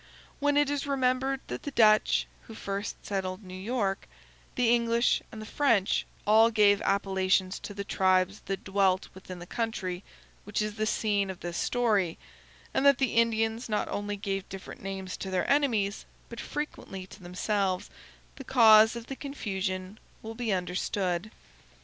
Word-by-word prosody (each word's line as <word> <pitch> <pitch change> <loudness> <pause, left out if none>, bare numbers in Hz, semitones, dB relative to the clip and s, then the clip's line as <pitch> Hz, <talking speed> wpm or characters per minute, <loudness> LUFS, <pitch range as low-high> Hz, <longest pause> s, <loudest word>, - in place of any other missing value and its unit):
When 290 0 +2
it 290 -1 +3
is 285 0 -2
remembered 265 0 +1
that - - -6
the - - -5
Dutch 215 -5 +4 0.2
(who 225 - -10
first 200 -1 -5
settled 190 0 -3
New 185 -1 -10
York), 200 -1 -2 0.5
the 240 -2 +3
English, 235 0 +2
and 220 - -8
the 215 - -7
French, 230 -6 +1 0.2
all 220 +2 +6
gave 205 -2 +4
appellations 190 -1 +1
to 205 - -8
the 200 - -4
tribes 185 0 +2
that 195 0 -3
dwelt 195 -1 +1
within 185 -1 -9
the 175 - -9
country 190 -4 -3 0.4
which 205 +1 -3
is 215 0 -1
the 215 0 -2
scene 205 -3 0
of 190 - -7
this 175 0 -4
story, 210 -9 +1 0.6
and - - +1
that 280 -2 +6
the 265 -3 0
Indians 225 0 +1
not 210 - 0
only 205 0 -3
gave 195 -1 -3
different 195 0 -9
names 190 -1 -5
to 190 - -5
their 185 -1 0
enemies, 230 -9 +1 0.2
but 235 - -8
frequently 195 -10 -5
to 190 +1 -14
themselves, 185 +1 -1 0.5
the 270 - -7
cause 220 -3 +6
of 235 -1 -6
the 270 - -6
confusion 195 -8 -4 0.2
will 225 0 -6
be 230 -1 -2
understood. 180 +1 -1
205 Hz, 160 wpm, -28 LUFS, 190-230 Hz, 0.6 s, all